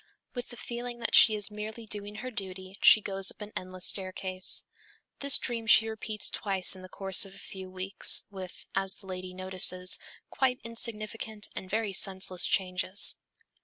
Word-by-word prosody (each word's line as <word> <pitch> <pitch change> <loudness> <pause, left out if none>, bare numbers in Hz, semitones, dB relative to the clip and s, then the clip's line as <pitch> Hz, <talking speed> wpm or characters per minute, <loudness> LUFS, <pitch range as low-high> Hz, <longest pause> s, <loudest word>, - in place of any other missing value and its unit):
"With 245 -1 -7
the 240 - -11
feeling 240 +1 -6
that 230 - -3
she 220 - +7
is 210 0 +1
merely 215 +2 -8
doing 210 -1 -7
her 255 +4 -7
duty, 190 -2 -7
she 215 - +7
goes 195 -1 -2
up - - -9
an 210 0 -10
endless 185 0 -4
staircase." 185 -1 +2 0.6
This 280 -2 +7
dream 230 -3 -2
she 220 0 +5
repeats 220 -1 -2
twice 195 -2 +2
in 185 - -13
the 185 - -13
course 190 0 -1
of 195 -1 -11
a - - -14
few 190 -2 -10
weeks, 185 +1 +3
with 190 -2 -10
as 195 0 +1
the 195 - -18
lady 185 -1 -8
notices 185 0 +2 0.3
quite 260 -1 -1
insignificant 220 -2 -2
and 185 - -8
very 215 -1 -2
senseless 190 -1 0
changes. 185 +1 +3
200 Hz, 170 wpm, -28 LUFS, 185-220 Hz, 0.6 s, she